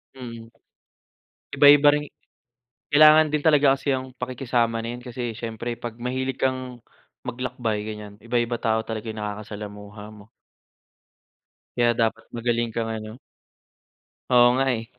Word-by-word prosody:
Mm. 115 -3 -9 1.1
Iba-iba 145 0 +7
rin. 150 - -2 0.9
Kailangan 155 +1 +7
din 150 - +1
talaga 145 -3 +5
kasi 140 +1 -1
yung 130 0 -4
pakikisama 120 -2 -1
na 115 +1 -5
yan, 125 - -12
kasi 120 -1 -4
siyempre 115 +1 -5
'pag 120 -1 -7
mahilig 130 +1 -3
kang 130 -2 -2 0.4
maglakbay, 120 -4 -3
ganiyan, 105 -1 -8
iba-iba 120 +1 -1
tao 110 0 +1
talaga 110 0 -5
yung 110 - -8
nakakasalamuha 105 0 -7
mo. 105 0 -15 1.5
Kaya 120 -1 +3
dapat 115 0 0
magaling 120 0 0
kang 115 0 -2
ano 110 0 -6 1.2
Oo 120 0 +8
nga 135 - +2
eh, 115 0 -8
120 Hz, 130 wpm, -24 LUFS, 110-130 Hz, 1.5 s, Oo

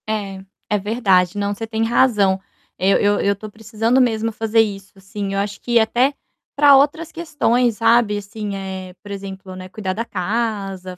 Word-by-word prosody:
É, 200 -3 -3 0.3
é 210 - +2
verdade. 195 -3 +1
Não, 200 0 -1
você 225 +2 -6
tem 220 0 -1
razão. 215 -5 +3 0.4
Eu 190 +2 +3
eu 205 0 +2
eu 200 0 +1
tô 215 +2 -9
precisando 225 +3 0
mesmo 225 -2 +1
fazer 225 +1 +2
isso, 200 -2 -5
assim, 195 +1 -5
eu 195 - 0
acho 205 0 -4
que 240 -1 +2
até 240 +5 +2 0.4
para 285 -1 +7
outras 295 +4 +2
questões, 250 -8 0
sabe. 230 -2 +3
Assim, 205 0 -6
eh, 190 -1 -6
por 205 - -10
exemplo, 195 -1 -7
né, 185 0 -9
cuidar 190 -1 -4
da 225 +4 -3
casa, 195 -3 -3
210 Hz, 175 wpm, -20 LUFS, 195-230 Hz, 0.4 s, para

